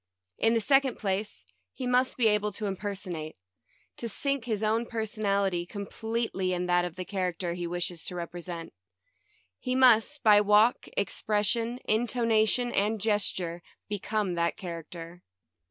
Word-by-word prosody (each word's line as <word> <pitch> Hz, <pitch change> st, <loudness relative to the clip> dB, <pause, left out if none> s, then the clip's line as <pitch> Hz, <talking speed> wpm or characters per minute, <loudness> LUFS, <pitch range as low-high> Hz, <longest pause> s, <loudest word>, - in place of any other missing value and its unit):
In 225 Hz, +1 st, +3 dB
the 225 Hz, -, +2 dB
second 270 Hz, +2 st, +3 dB
place, 195 Hz, -, -3 dB, 0.3 s
he 255 Hz, -, -5 dB
must 250 Hz, +1 st, +2 dB
be 245 Hz, -, +2 dB
able 210 Hz, 0 st, +2 dB
to 210 Hz, +1 st, -4 dB
impersonate 190 Hz, -5 st, -4 dB, 0.3 s
— -, -, -38 dB
to 235 Hz, -, -4 dB
sink 275 Hz, +2 st, -2 dB
his 220 Hz, -3 st, -2 dB
own 225 Hz, +2 st, +1 dB
personality 200 Hz, -5 st, 0 dB
completely 200 Hz, 0 st, -2 dB
in 180 Hz, 0 st, -1 dB
that 175 Hz, 0 st, +3 dB
of 175 Hz, -1 st, -6 dB
the 185 Hz, -1 st, -5 dB
character 180 Hz, -3 st, -2 dB
he 175 Hz, 0 st, -4 dB
wishes 175 Hz, -1 st, -3 dB
to 180 Hz, -, -4 dB
represent. 170 Hz, -1 st, -6 dB, 0.9 s
He 255 Hz, -, -2 dB
must, 255 Hz, +2 st, +4 dB
by 210 Hz, -2 st, +7 dB
walk, 210 Hz, +3 st, +4 dB
expression, 215 Hz, +4 st, 0 dB
intonation, 230 Hz, +1 st, +2 dB
and 210 Hz, +1 st, +1 dB
gesture, 190 Hz, -5 st, 0 dB, 0.3 s
become 210 Hz, -1 st, -1 dB
that 170 Hz, 0 st, 0 dB
char 170 Hz, -3 st, -5 dB
acter. 170 Hz, +2 st, -10 dB
205 Hz, 145 wpm, -29 LUFS, 180-225 Hz, 0.9 s, by